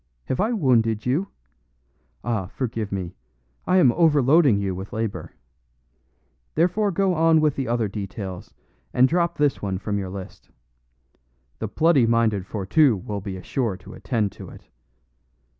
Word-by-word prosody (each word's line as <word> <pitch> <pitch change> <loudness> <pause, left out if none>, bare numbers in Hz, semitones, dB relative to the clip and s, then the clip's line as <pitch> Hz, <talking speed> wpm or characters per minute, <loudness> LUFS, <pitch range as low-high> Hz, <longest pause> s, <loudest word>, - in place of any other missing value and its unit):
Have 130 - -2
I 215 +4 +1
wounded 115 - +2
you? 145 +11 0 1.0
Ah, 110 -6 -2
forgive 115 -2 -4
me; 95 -3 -4 0.5
I 185 - +4
am 150 -10 +6
overloading 150 -4 +4
you 100 -2 -1
with 95 +2 -7
labor. 110 -1 -4 1.2
Therefore 180 +6 +2
go 195 0 +1
on 165 -1 +4
with 150 -2 +2
the 135 - -3
other 120 -2 0
details, 100 -2 -6 0.4
and 130 +1 +6
drop 170 +3 0
this 145 -2 +1
one 95 -2 -2
from 100 +1 -2
your 95 -2 -4
list. 95 -1 -9 1.1
The 110 - -3
bloody 145 +1 +3
minded 110 -5 +1
Fourtou 105 - +2
will 105 -1 -4
be 95 -1 -6
sure 115 -8 -2
to 95 - -13
attend 105 0 -1
to - - -11
it. - - -15
115 Hz, 145 wpm, -23 LUFS, 100-155 Hz, 1.2 s, am